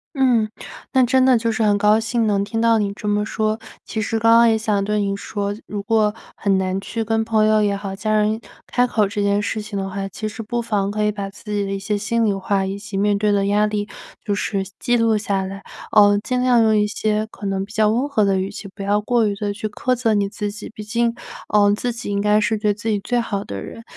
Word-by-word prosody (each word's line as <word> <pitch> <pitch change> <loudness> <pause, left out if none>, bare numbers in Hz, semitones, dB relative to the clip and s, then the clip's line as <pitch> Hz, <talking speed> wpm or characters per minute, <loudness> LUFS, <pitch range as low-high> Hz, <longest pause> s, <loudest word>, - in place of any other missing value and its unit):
嗯， 245 -5 +2 0.4
那 260 -2 +4
真 260 +1 +3
的 255 -2 +5
就 230 0 0
是 225 0 -1
很 205 -1 +3
高 210 +1 +4
兴 225 +1 0
能 200 -2 +1
听 225 +2 -3
到 230 -1 +4
你 205 -2 -1
这 210 0 -5
么 205 0 +1
说， 215 0 -1 0.3
其 220 - -3
实 225 +2 -1
刚 230 +1 +4
刚 235 0 +6
也 220 - +2
想 210 -3 0
对 210 +1 0
你 200 -1 -1
说， 200 0 -3
如 205 -1 -4
果 215 -1 +2 0.2
很 195 -2 +1
难 185 0 -1
去 230 +2 -3
跟 225 0 0
朋 220 -1 +2
友 215 0 +4
也 200 -1 +1
好， 195 -1 -5
家 215 +2 -2
人 215 +1 +2 0.3
开 245 0 +2
口 215 -4 +1
这 205 0 -2
件 200 0 +2
事 210 +1 -2
情 210 -1 -5
的 195 0 -3
话。 195 +1 -4
其 215 - -4
实 225 +2 -7
不 235 +2 -2
妨 205 -4 -1
可 210 +1 -2
以 210 - +3
把 200 -1 -5
自 195 - -17
己 205 -1 0
的 195 - -4
一 195 - -2
些 205 +2 -2
心 225 +3 0
里 205 - +2
话 195 0 0
以 195 +1 -4
及 205 -1 -7
面 205 0 +2
对 210 +1 +1
的 200 -1 +2
压 205 +1 +3
力 210 0 -2 0.4
就 205 -3 0
是 200 -1 -1
记 240 0 +1
录 225 -1 +3
下 200 -2 -1
来， 195 +1 -7 0.3
呃， 205 -1 +6
尽 250 +1 -1
量 245 -2 +4
用 220 -1 +4
一 210 0 +3
些 215 0 -1
可 205 - -8
能 195 0 -1
比 210 - -13
较 215 -1 +3
温 240 +6 +1
和 260 -7 +1
的 195 -1 +2
语 190 +1 -3
气， 200 - -8
不 200 - -7
要 205 +1 +1
过 230 +1 +2
于 205 - 0
地 205 0 -2
去 215 +1 -4
苛 255 +4 -1
责 235 -3 +1
你 205 -1 +1
自 205 +1 -4
己。 210 - -8
毕 215 - -7
竟， 235 +1 0 0.4
呃， 205 -1 +5
自 245 +3 -2
己 230 -3 -6
应 200 0 0
该 210 +1 +3
是 215 0 0
对 210 -1 +1
自 210 +2 -6
己 210 - +1
最 245 +4 -1
好 205 -3 -3
的 100 -1 -6
人， 230 - -9
210 Hz, 285 characters per minute, -21 LUFS, 200-225 Hz, 0.4 s, 刚